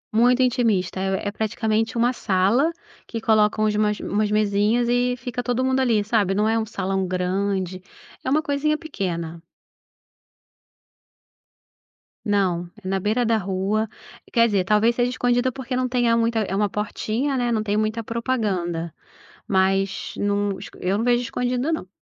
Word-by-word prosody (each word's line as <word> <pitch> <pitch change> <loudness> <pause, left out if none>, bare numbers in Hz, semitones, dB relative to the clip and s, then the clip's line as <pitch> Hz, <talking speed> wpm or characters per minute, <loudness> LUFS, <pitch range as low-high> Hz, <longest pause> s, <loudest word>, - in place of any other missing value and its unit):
Muito 245 +3 +4
intimista, 225 -8 +1
é 195 +1 -1
praticamente 220 +1 -1
uma 240 +2 +3
sala, 210 - +2 0.4
que 230 - -4
coloca 215 -1 +3
umas 210 -1 +1
umas 210 +1 0
mesinhas 210 +3 +2
e 245 +1 +2
fica 245 0 -4
todo 245 +1 0
mundo 260 0 +2
ali, 230 -5 +2
sabe, 205 -3 +1
não 210 +2 +2
é 225 +1 +2
um 220 - -3
salão 190 -2 -2
grande, 185 0 -1 0.4
é 260 - -2
uma 305 +3 +2
coisinha 295 +2 0
pequena. 170 - -4 2.8
Não, 185 -5 0
é 185 - -8
na 190 0 0
beira 220 +5 +1
da 225 -1 +3
rua. 200 +3 -1 0.4
Quer 230 0 +4
dizer, 200 -4 +1
talvez 215 +4 +3
seja 245 0 +1
escondida 245 0 +1
porque 260 0 -5
não 255 0 0
tenha 240 -2 +2
muita 230 0 +1
é 195 -3 -1
uma 205 0 +1
portinha, 220 +6 -2
né, 245 -1 0
não 220 -2 +1
tem 205 -1 -1
muita 215 +2 0
propaganda, 200 -9 -2 0.6
mas 195 0 +1
não 205 -1 0 0.2
eu 190 +3 0
não 230 - 0
vejo 245 0 +3
escondida 250 +4 -1
não. 315 - -3
215 Hz, 155 wpm, -23 LUFS, 195-245 Hz, 2.8 s, Muito